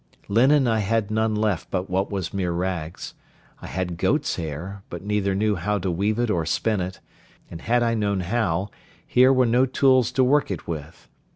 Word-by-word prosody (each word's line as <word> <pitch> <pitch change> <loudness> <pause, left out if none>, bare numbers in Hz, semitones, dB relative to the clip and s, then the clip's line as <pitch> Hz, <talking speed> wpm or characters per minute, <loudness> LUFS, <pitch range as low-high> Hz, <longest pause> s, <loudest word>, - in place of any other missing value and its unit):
Linen 130 +6 +4
I 110 -1 +2
had 110 0 0
none 110 0 +1
left 105 -5 -1
but 95 0 -2
what 95 +2 -1
was 95 -4 -4
mere 95 -3 -1
rags; 85 -2 -4 0.5
I - - -8
had 90 -2 -3
goat's - - +1
hair, 85 +5 -6
but 85 +1 -7
neither 100 -1 0
knew 105 0 +1
how 105 +5 -1
to 95 -1 -2
weave 100 +5 0
it 120 -2 0
or 85 -5 0
spin 100 +5 0
it; 90 +1 -5 0.5
and 80 - -8
had 120 +1 +2
I 115 0 +1
known 100 -3 0
how, 95 -1 -1 0.3
here 130 +1 +5
were 130 -1 +4
no 125 +3 +3
tools 130 -1 +3
to 130 - +3
work 145 +3 +3
it 95 - -5
with. 80 0 -7
100 Hz, 195 wpm, -24 LUFS, 90-115 Hz, 0.5 s, here